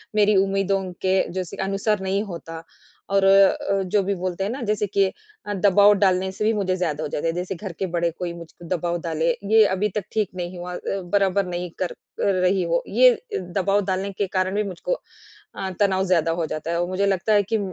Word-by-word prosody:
मेरी 210 -1 +4
उम्मीदों 195 0 0 0.2
के 190 0 +3
जैसी 185 +1 -4
अनुसार 200 +1 0
नहीं 195 +2 0
होता 165 -4 -8 0.5
और 195 -1 +4
अ, 195 0 +4
जो 200 +2 +1
भी 200 +1 0
बोलते 185 +1 -3
हैं 205 - -2
ना 260 +1 -5
जैसे 210 -1 +1
कि 195 0 +2 0.4
अ, 205 - -3
दबाव 200 +1 +5
डालने 190 -1 +2
से 200 - -4
भी 225 - +3
मुझे 190 -3 0
ज़्यादा 155 -4 -2
हो - - -2
जाता 150 - -2
है। 165 - 0
जैसे 180 +2 -3
घर 195 +1 -6
के 190 - 0
बड़े 170 0 +1
कोई 175 -1 -2
मुझको 170 0 -12
दबाव 175 -1 -1
डाले। 165 -1 -1 0.2
ये 220 -1 +7
अभी 210 +3 0
तक 210 - -1
ठीक 215 -3 0
नहीं 180 0 -5
हुआ। 180 0 -6 0.4
बराबर 200 -1 +2
नहीं 180 0 -4
कर 180 - -1 0.5
रही 185 0 +2
हो। 170 0 0
ये 250 +3 +6 0.2
दबाव 195 +2 0
डालने 195 +1 -1
के 195 0 -2
कारण 185 +1 -1
भी 210 - +1
मुझको 195 - -3 0.6
अ, 190 -1 -4
तनाव 190 -1 +2
ज़्यादा 165 -3 +2
हो 160 - 0
जाता 155 +2 -4
है। 170 0 0
और 175 - -1
मुझे 190 +2 0
लगता 195 +2 +1
है 205 -1 +5
कि 220 - +3
190 Hz, 215 wpm, -23 LUFS, 175-200 Hz, 0.6 s, ये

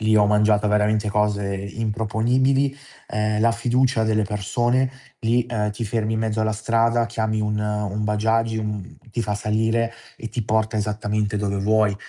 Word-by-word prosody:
lì 110 0 +3
ho 105 - +5
mangiato 105 0 +3
veramente 105 +1 +2
cose 100 -1 0
improponibili, 115 +7 0 0.3
ehm, 105 0 0
la 115 +1 +4
fiducia 120 0 +1
delle 110 0 +2
persone, 120 +5 0 0.3
lì, 120 +1 +2
uhm, 105 -3 0
ti 110 +3 -4
fermi 110 +1 -1
in 110 - -1
mezzo 110 -1 -1
alla 110 0 +1
strada, 115 +2 +1
chiami 110 -2 -1
un, 105 0 -1
ehm, 105 -1 -1
un 105 +2 -2
Bajaj, 110 +2 +1
uhm, 105 -3 -5
ti 120 +2 -2
fa 105 -1 -2
salire 110 +2 0 0.2
e 115 - -6
ti 120 - -3
porta 110 +1 0
esattamente 105 0 -1
dove 100 -1 -1
vuoi 105 +1 +2
110 Hz, 170 wpm, -23 LUFS, 105-115 Hz, 0.3 s, ho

